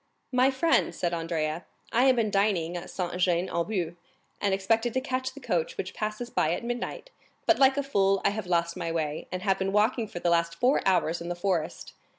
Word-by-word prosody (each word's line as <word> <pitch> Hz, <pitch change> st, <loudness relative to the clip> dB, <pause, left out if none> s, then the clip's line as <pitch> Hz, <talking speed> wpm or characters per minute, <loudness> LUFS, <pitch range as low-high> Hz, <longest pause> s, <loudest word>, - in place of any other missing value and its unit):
"My 255 Hz, +1 st, +4 dB
friend," 320 Hz, +5 st, +2 dB
said 175 Hz, -1 st, -1 dB
Andrea, 165 Hz, -1 st, -2 dB, 0.3 s
"I 245 Hz, +3 st, +4 dB
have 260 Hz, -1 st, +5 dB
been 220 Hz, -3 st, +1 dB
dining 195 Hz, -5 st, +1 dB
at 175 Hz, -, -6 dB
Saint 180 Hz, -1 st, -3 dB
Jean 180 Hz, 0 st, +2 dB
aux 170 Hz, -, +1 dB
Bois, 180 Hz, -5 st, -2 dB, 0.5 s
and 200 Hz, -, +2 dB
expected 225 Hz, +5 st, +1 dB
to -, -, +3 dB
catch 260 Hz, 0 st, -3 dB
the -, -, -8 dB
coach 175 Hz, -, -1 dB
which 185 Hz, -, -4 dB
passes 215 Hz, +3 st, -4 dB
by 155 Hz, -, +1 dB
at 180 Hz, -, -4 dB
midnight, 240 Hz, -, -4 dB, 0.3 s
but -, -, +4 dB
like 270 Hz, 0 st, +5 dB
a 285 Hz, -, +1 dB
fool 195 Hz, -7 st, +2 dB
I 200 Hz, -, +4 dB
have 205 Hz, -2 st, -5 dB
lost 170 Hz, -1 st, +1 dB
my 170 Hz, -2 st, -3 dB
way, 155 Hz, -2 st, -2 dB
and 185 Hz, 0 st, -4 dB
have 195 Hz, -2 st, +2 dB
been 195 Hz, 0 st, 0 dB
walking 220 Hz, +3 st, +2 dB
for 205 Hz, -, -9 dB
the 175 Hz, 0 st, +1 dB
last 170 Hz, 0 st, +2 dB
four 255 Hz, +3 st, +3 dB
hours 175 Hz, -3 st, +2 dB
in 170 Hz, -, -5 dB
the 175 Hz, -, -2 dB
forest. 175 Hz, -3 st, -2 dB
195 Hz, 220 wpm, -28 LUFS, 170-235 Hz, 0.5 s, have